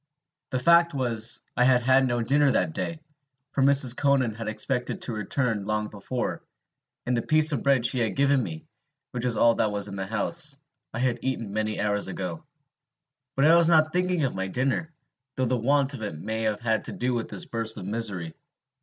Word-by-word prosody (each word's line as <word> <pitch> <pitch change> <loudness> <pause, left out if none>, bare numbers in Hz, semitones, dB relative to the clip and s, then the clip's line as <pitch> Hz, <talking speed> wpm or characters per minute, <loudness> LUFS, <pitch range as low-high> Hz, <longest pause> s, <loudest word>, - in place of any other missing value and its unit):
The 130 - -1
fact 170 +4 +4
was, 120 -4 -1
I 125 - +3
had 125 -1 +4
had 130 +1 +4
no 120 -1 0
dinner 140 +4 +3
that 160 - 0
day, 165 +1 -3 0.5
for - - -1
Mrs. 135 -2 +4
Conan 135 -5 +1
had 110 0 -7
expected 125 - -2
to 120 - -3
return 110 0 -2
long 105 0 -1
before; 110 +5 -4 0.6
and 125 - 0
the 115 - 0
piece 155 +3 +3
of 145 - -1
bread 135 -4 +2
she 125 +1 +2
had 115 -2 -1
given 140 -1 +3
me, 80 -8 -6 0.5
which 125 0 -3
was 120 -3 0
all 115 0 +5
that 110 - 0
was 105 0 -1
in 100 - -7
the 95 0 -4
house, 140 +7 0 0.3
I - - -6
had 125 -1 0
eaten 115 -6 -3
many 110 0 -2
hours 105 -1 0
ago. 90 -3 -5 0.9
But 135 - +3
I 160 +2 +7
was 170 -1 +5
not 155 -1 +4
thinking 180 -2 +1
of 135 - 0
my 95 0 -3
dinner, 135 - -1 0.4
though 130 - 0
the 125 - +1
want 140 +3 +1
of 130 - -7
it 105 -8 -5
may 110 +5 -3
have 110 0 -1
had 110 -2 0
to - - -4
do 125 +1 -1
with 115 -2 -3
this - - -4
burst 115 -1 -2
of 90 - -7
misery. 100 -6 -4
125 Hz, 205 wpm, -26 LUFS, 110-140 Hz, 0.9 s, I